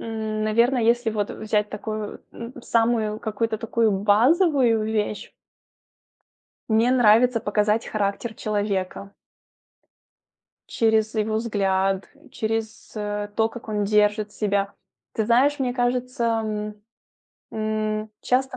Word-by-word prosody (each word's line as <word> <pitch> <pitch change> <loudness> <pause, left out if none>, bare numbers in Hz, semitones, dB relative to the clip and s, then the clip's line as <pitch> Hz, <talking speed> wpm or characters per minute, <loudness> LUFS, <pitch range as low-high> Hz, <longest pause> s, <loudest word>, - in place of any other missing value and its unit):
м, 220 -1 -3
наверное, 235 +3 +2
если 235 0 +2
вот 205 -1 -2
взять 210 -1 -1
такую, 215 0 -5
м, 235 +1 -8
самую 225 -2 +1
какую-то 220 +1 -2
такую 225 -1 +1
базовую 235 - +3
вещь 215 -1 -2 1.4
мне 225 +3 +3
нравится 240 0 +5
показать 210 +1 0
характер 215 +2 -2
человека 200 -2 -2 1.6
через 220 -1 +1
его 215 0 0
взгляд, 195 -3 0 0.2
через, 220 0 -3
э, 205 0 -3
то, 220 0 +3
как 230 -1 -10
он 210 -1 0
держит 210 0 +2
себя. 200 -1 -1 0.4
Ты 220 - -1
знаешь, 265 +6 +3
мне 250 -2 0
кажется, 250 0 -1 0.2
м 210 -1 -4 0.8
м, 215 0 -2
часто 255 +1 0
220 Hz, 110 wpm, -24 LUFS, 210-235 Hz, 1.6 s, нравится